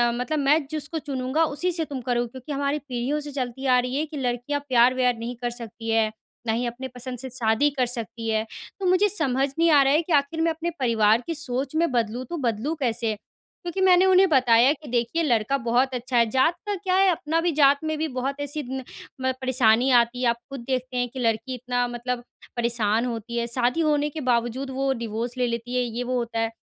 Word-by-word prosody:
मतलब 250 +5 -2
मैं 285 +2 +3
जिसको 310 +1 -3
चुनूँगा, 275 +1 -1
उसी 325 +4 0
से 325 -2 -1
तुम 270 -3 -6
करोगी 240 0 0
क्योंकि 260 +3 -9
हमारी 280 +1 -1
पीढ़ियों 270 +1 -2
से 295 0 -6
चलती 265 -1 -4
आ 255 -1 +5
रही 250 +1 -2
है 300 +3 0
कि 305 -1 -8
लड़कियाँ 250 +2 -1
प्यार-व्यार 250 0 +4
नहीं 235 +2 -5
कर 240 - -1
सकती 230 -1 -8
हैं, 225 -1 +2 0.4
ना 220 - +2
ही 240 +2 -1
अपने 245 +2 -5
पसंद 250 0 -7
से 260 - -5
शादी 240 +3 +1
कर 255 - +3
सकती 230 -1 -4
हैं।" 220 0 +1 0.3
तो 385 - -3
मुझे 370 +3 +4
समझ 270 -9 +1
नहीं 335 0 +4
आ 290 -2 +7
रहा 270 +1 +3
है 310 - +4
कि 335 -1 -3
आखिर 290 +3 +1
मैं 330 - +2
अपने 325 +1 -3
परिवार 225 -3 +3
की 330 - -2
सोच 270 -1 -2
मैं 330 -3 +2
बदलूँ, 240 +1 -1
तो 340 - -5
बदलूँ 250 +3 -1
कैसे? 230 -4 0 0.5
क्योंकि 350 +2 -3
मैंने 370 0 +6
उन्हें 380 0 +6
बताया 250 -3 +5
कि 300 0 -13
देखिए, 240 +7 0
लड़का 240 -1 +1
बहुत 250 +2 +1
अच्छा 245 0 -2
है। 235 - +5
जात 265 +8 +2
का 415 - 0
क्या 370 -1 -1
है? 385 0 +5
अपना 320 -1 -1
भी 345 - +1
जात 280 +1 +5
में 315 0 -2
भी 315 +1 -1
बहुत 270 +2 -2
ऐसी 300 +2 -3
न 265 0 -4 0.4
म 260 0 +1
परेशानी 250 -1 +3
आती 240 +1 +3
है। 245 - +3
आप 235 - 0
खुद 275 -2 -6
देखते 255 -1 -2
हैं 245 0 +1
कि 260 - -8
लड़की 225 +1 0
इतना 245 0 -1
मतलब 240 0 -4 0.3
परेशान 230 -1 +1
होती 235 -1 -4
है, 235 - 0
शादी 245 +6 +1
होने 300 -1 +2
के 310 +1 -6
बावजूद 250 +1 0
वो 270 +1 0
डाइवोर्स 235 +1 -4
ले 250 -1 +1
लेती 235 +1 -4
है, 250 - +2
ये-वो 245 +2 -3
होता 235 -1 -2
है। 225 0 0
255 Hz, 225 wpm, -24 LUFS, 235-295 Hz, 0.5 s, आ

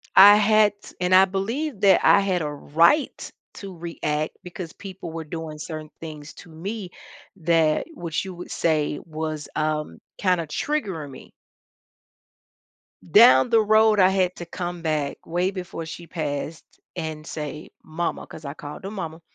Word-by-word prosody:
I 205 +2 +10
had 215 0 +5
t - - -14
and 180 +1 +2
I 190 +1 +8
believe 215 +6 -3
that 195 -2 +6
I - - +7
had 185 -3 0
a 150 - -2
right 165 - +2 0.3
to 195 -2 -8
react 155 -2 -3
because 180 -2 -7
people 190 -4 -8
were 165 0 -5
doing 160 0 -6
certain 155 -1 -6
things 150 -2 -9
to 175 - -13
me 190 +5 -6 0.5
that 165 - +2
which 170 - -3
you 190 - -6
would 175 - -9
say 150 -3 0
was, 155 -1 -5
um, 155 0 -2 0.2
kinda 180 -4 +1
triggering 180 - -3
me. 130 - -13 1.8
Down 130 - +7
the 225 -2 +5
road, 215 0 +4
I 185 - +6
had 185 -1 +1
to 175 - -6
come 175 0 -5
back 150 -3 -1
way 175 +3 0
before 180 -3 -6
she 170 +1 -9
passed 155 -1 -4 0.3
and 160 -2 -5
say, 150 0 -6
"Mama," 165 +2 -3
'cause 155 - -11
I 140 - -5
called 150 +5 -9
her 200 - -5
mama. 165 -5 -6
170 Hz, 160 wpm, -24 LUFS, 155-190 Hz, 1.8 s, I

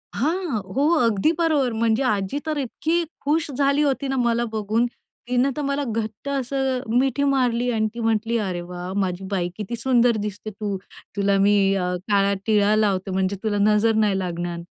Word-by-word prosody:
हां. 315 - -1 0.2
हो, 285 +3 +3 0.2
अगदी 225 +7 +2
बरोबर. 295 -7 +2
म्हणजे 225 +3 +1
आजी 210 +2 0
तर 310 -1 -2
इतकी 320 +6 -1 0.2
खूश 305 +2 0
झाली 280 +2 +2
होती 275 -1 0
ना 270 - -1
मला 240 -1 +1
बघून. 220 +2 +1 0.4
तिनं 250 +2 +2
तर - - -1
मला 280 0 -1
घट्ट 220 +3 -4
असं 265 -1 -1 0.2
मिठी 270 +1 +1
मारली 250 -3 +1
आणि 220 -1 +1
ती 235 - -7
म्हटली, 225 +1 0
"अरे 185 -5 -2
वाह! 180 +1 -6
माझी 185 0 -2
बाई, 175 -2 0
किती 215 +2 -4
सुंदर 240 -2 +2
दिसते 210 +1 -5
तू. 205 -1 -4 0.4
तुला 200 0 +2
मी 205 +1 +4 0.3
काळा 195 +2 +1
टिळा 210 -1 +3
लावते, 195 -3 +1
म्हणजे 190 +1 0
तुला 210 -2 0
नजर 220 +2 +3
नाही 195 -2 +1
लागणार." 175 -1 -3
225 Hz, 170 wpm, -23 LUFS, 200-270 Hz, 0.4 s, मी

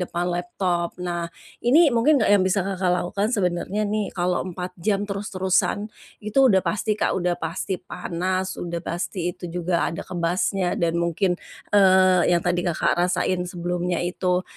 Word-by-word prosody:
depan 175 -1 -2
laptop. 175 0 -2
Nah, 175 -1 -2 0.4
ini 300 +5 +6
mungkin 250 +7 +4
enggak 215 - +2
yang 190 - +3
bisa 190 0 +1
Kakak 190 -2 -1
lakukan 195 +3 -1
sebenarnya 185 +1 -1
nih 210 0 -1
kalau 180 0 +1
4 180 +1 -6
jam 200 +3 0
terus-terusan, 200 0 -1 0.3
itu 215 +5 -1
udah 190 -5 +4
pasti 210 +4 0
Kak - - +1
udah 175 -1 0
pasti 165 +4 -2
panas 185 +1 -3
udah 170 -1 -4
pasti 175 +3 -4 0.2
itu - - -11
juga 175 0 0
ada 165 - -5
kebasnya 180 +1 -1
dan 170 -1 +1
mungkin, 170 +2 +1 0.4
eee, 185 -3 +5
yang 175 - +4
tadi 175 0 +1
Kakak 170 - +1
rasain 180 0 0
sebelumnya 175 0 -2
itu, 180 +1 0
180 Hz, 155 wpm, -23 LUFS, 175-195 Hz, 0.4 s, ini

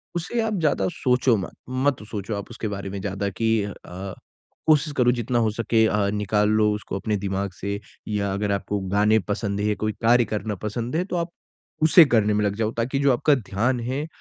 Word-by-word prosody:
उसे 175 +8 -2
आप 220 -1 -1
ज़्यादा 145 - +1
सोचो 125 -1 +2
मत, 95 - -5 0.2
मत 130 -1 0
सोचो 105 0 -3
आप 100 - -6
उसके 115 -2 -5
बारे 100 -1 -5
में 100 +1 -5
ज़्यादा 100 +1 -2
कि 110 +3 +1
अ, 100 -1 -5 0.9
कोशिश 150 -1 +3
करो 125 -1 +4
जितना 120 0 0
हो 110 -2 +2
सके 115 0 +2
अ, 105 -2 +1
निकाल 105 0 +1
लो 110 0 +3
उसको 105 -1 -5
अपने 105 +1 -1
दिमाग 100 0 -2
से 100 +1 -2 0.3
या 100 -2 -1
अगर 100 +1 -1
आपको 100 +1 -1 0.2
गाने 105 +2 +4
पसंद 100 0 -3
है 105 - 0
या 105 - +1
कोई 110 0 0
कार्य 120 +1 +5
करना 105 0 -2
पसंद 115 +5 -3
है, 170 - +2
तो 185 - -4
आप 170 0 -1 0.5
उसे 160 +1 +8
करने 110 -5 +2
में 105 0 +1
लग 100 0 0
जाओ 110 0 -1
ताकि 125 +4 0
जो 140 -1 +4
आपका 145 +5 +3
ध्यान 120 +2 -1
है 130 +6 -3
110 Hz, 210 wpm, -24 LUFS, 100-125 Hz, 0.9 s, उसे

